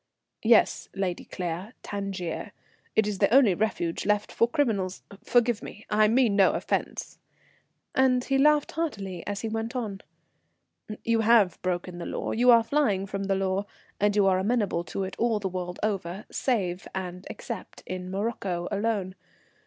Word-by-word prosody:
"Yes, 225 0 +4
Lady 190 -3 -2
Claire, 180 +5 -5
Tangier. 195 -4 -4 0.4
It 220 - +4
is 205 -2 -3
the - - +3
only 250 -6 +6
refuge 175 -4 -1
left 210 0 +1
for 230 - +3
criminals 210 -8 -1 0.2
forgive 240 -1 +2
me, 215 - -10
I 215 0 +5
mean 230 -2 +3
no 195 -2 +5
offence," - - -3 0.7
and 255 -1 +3
he 270 0 +1
laughed 300 +1 +4
heartily 200 - -3
as 205 -1 -3
he 225 - -2
went 225 +3 -3
on. 210 -6 -3 1.0
"You 230 0 +2
have 220 -5 +4
broken 180 -1 -3
the - - -5
law, - - -3
you 245 +2 +3
are 230 -1 +8
flying 225 -8 +1
from 195 0 -4
the 195 0 +1
law, 195 +1 -1 0.3
and 205 0 +2
you 205 -2 +4
are 185 -1 +4
amenable 205 -4 0
to 195 - -3
it 190 0 -5
all 230 -2 +2
the 200 - -2
world 180 -1 -5
over, 195 -1 -2
save 190 -8 -1
and 180 -1 -5
except 230 -6 -7
in 185 0 -5
Morocco 190 -3 -2
alone. 200 -2 -1
205 Hz, 160 wpm, -27 LUFS, 185-230 Hz, 1.0 s, are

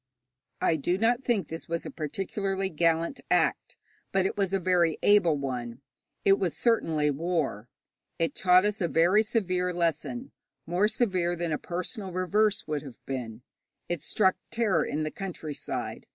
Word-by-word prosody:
I 160 - +3
do 175 +5 0
not 235 +4 +2
think 215 -10 +1
this 165 +1 -8
was 170 0 -2
a - - -5
particularly 195 +5 -2
gallant 165 - +1
act, - - +1 0.4
but 190 -1 +2
it - - -1
was 195 -2 0
a 195 - +1
very 175 -3 +2
able 180 -7 +5
one. 125 -3 -4 0.4
It 195 0 +5
was 180 -4 -1
certainly 160 -11 +2
war. 145 - -2 0.5
It 165 -1 0
taught 185 +1 +5
us 210 0 -1
a 175 - +2
very 175 +6 +4
severe 185 -5 0
lesson 165 -7 -2 0.3
more 180 +5 +2
severe 185 -7 0
than 170 -1 -2
a 150 - -1
personal 185 +3 -4
reverse 200 +4 +1
would 150 -2 -2
have 135 -5 -10
been. 125 -3 -5 0.4
It 175 -4 -2
struck 190 +2 +2
terror 230 -6 +1
in 155 +2 -2
the 155 - -3
countryside. 165 -6 -5
175 Hz, 160 wpm, -28 LUFS, 155-195 Hz, 0.5 s, able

